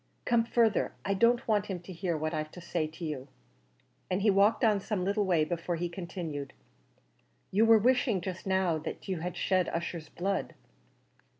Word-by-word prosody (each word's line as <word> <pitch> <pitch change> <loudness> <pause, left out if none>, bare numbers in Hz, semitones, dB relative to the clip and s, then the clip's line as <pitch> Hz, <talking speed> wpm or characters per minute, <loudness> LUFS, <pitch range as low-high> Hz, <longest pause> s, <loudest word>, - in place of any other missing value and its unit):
"Come 235 -1 +3
further; 230 -3 +2
I 200 - +1
don't 235 +4 +3
want 210 -2 +2
him 190 -3 -3
to 185 +1 -9
hear 170 -1 -2
what 155 +2 -2
I've 155 -1 -2
to - - -9
say 170 -2 -2
to 160 +2 -8
you;" 145 -4 -4 0.8
and 185 +2 0
he 210 - +5
walked 200 +6 +3
on 215 -3 +4
some 195 -2 -2
little 200 +1 +1
way 170 -5 +3
before 170 +1 -2
he 175 +1 -2
continued, 170 -5 -5 1.0
"you 210 +4 +4
were 225 0 +8
wishing 240 -2 +2
just 185 +1 -6
now 190 -4 +2
that 155 - -7
you 185 -3 -2
had 175 +1 -4
shed 185 -2 +1
Ussher's 165 -2 -4
blood?" 195 +4 -2
185 Hz, 185 wpm, -30 LUFS, 170-205 Hz, 1.0 s, were